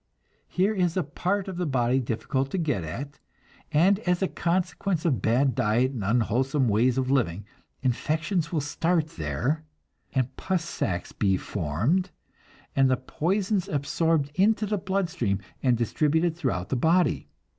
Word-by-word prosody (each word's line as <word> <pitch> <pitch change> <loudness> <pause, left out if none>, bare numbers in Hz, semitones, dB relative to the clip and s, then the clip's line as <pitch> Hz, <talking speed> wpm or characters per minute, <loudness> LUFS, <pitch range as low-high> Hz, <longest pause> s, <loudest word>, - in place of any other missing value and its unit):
Here 195 +4 +1
is 180 -3 0
a 185 - +2
part 185 +7 -2
of 190 -2 -5
the 180 -2 -1
body 130 -1 +2
difficult 130 +3 -2
to 190 - -2
get 145 - 0
at, 135 - -6 0.5
and 180 +6 +4
as 180 -2 0
a - - +2
consequence 180 0 -1
of 130 - +1
bad 125 +5 +2
diet 115 +5 +2
and 120 -7 -4
unwholesome 125 +5 +1
ways 120 +4 +3
of 130 0 0
living, 105 -8 0 0.4
infections 160 - 0
will 160 -4 0
start 160 +2 0
there, 100 - -2 0.5
and 130 -1 0
pus 185 -3 -1
sacs 90 - -3
be 95 -3 +1
formed, 105 - -1 0.7
and 135 -1 +4
the 130 - +3
poisons 185 - -1
absorbed 145 +1 +1
into 210 +5 +3
the 210 -1 -1
blood 190 0 0
stream 120 - -1 0.2
and 125 -3 +3
distributed 155 +7 +1
through 125 - -1
the - - 0
body. 165 +5 +2
145 Hz, 155 wpm, -26 LUFS, 120-175 Hz, 0.7 s, and